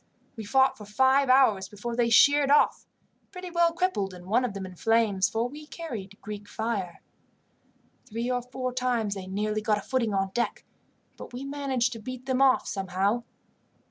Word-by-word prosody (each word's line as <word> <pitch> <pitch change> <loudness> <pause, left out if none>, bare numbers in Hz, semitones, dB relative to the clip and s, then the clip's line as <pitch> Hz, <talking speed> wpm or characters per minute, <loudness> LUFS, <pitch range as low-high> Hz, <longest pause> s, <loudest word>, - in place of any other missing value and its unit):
We 220 -3 -7
fought 265 +4 +3
for 210 - -9
five 265 +6 +3
hours 235 -8 +4
before 230 +3 -5
they 235 -1 +2
sheered 285 +4 +5
off, 290 - +3 0.4
pretty 365 -1 -8
well 340 0 +3
crippled, 330 - -1
and 175 0 -12
one 225 +7 +2
of 230 -5 -3
them 195 -1 -5
in 185 -1 -10
flames, 210 -2 +2
for 225 +3 -1
we 300 +4 -11
carried 230 - -7
Greek 205 -1 -7
fire. 205 -7 -4 1.1
"Three 230 +2 -3
or 250 0 0
four 255 +1 -5
times 245 -5 0
they 190 -2 -7
nearly 210 +2 -2
got 215 -1 +1
a - - -5
footing 230 -3 -1
on 195 0 0
deck, 240 +4 -2 0.5
but - - -10
we 255 +3 -6
managed 270 -3 -1
to 225 - -8
beat 255 +3 -8
them 260 0 0
off 265 -1 +4
somehow. 195 +4 -1
235 Hz, 180 wpm, -27 LUFS, 205-265 Hz, 1.1 s, sheered